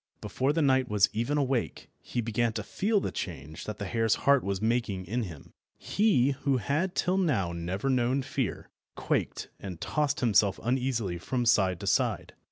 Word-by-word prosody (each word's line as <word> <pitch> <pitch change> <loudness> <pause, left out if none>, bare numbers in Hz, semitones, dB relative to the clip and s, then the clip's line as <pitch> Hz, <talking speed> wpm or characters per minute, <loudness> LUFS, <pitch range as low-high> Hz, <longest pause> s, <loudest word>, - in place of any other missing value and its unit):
Before 135 +2 -1
the 160 +1 +1
knight 130 -2 +3
was 105 -2 +3
even 120 +7 0
awake 135 -4 -1
he 120 - -3
began 115 0 0
to 105 - -3
feel 205 - 0
the - - -3
change 75 +4 -6
that 105 -1 -5
the 100 - -4
hare's 115 +2 +1
heart 140 -1 +5
was 100 -1 -2
making 110 -4 -1
in 120 +6 -2
him. 80 -7 -11 0.2
He, 195 - +2
who 140 0 0
had 155 - -1
till 185 +1 +1
now 120 - +1
never 90 +8 -3
known 130 +1 +1
fear, 130 -3 -3 0.2
quaked - - -2
and 90 -4 -7
tossed 150 - -1
himself 105 -5 +3
uneasily 120 -7 -1
from 125 +6 -2
side 95 -6 +3
to - - -5
side. - - 0
120 Hz, 175 wpm, -29 LUFS, 100-135 Hz, 0.2 s, heart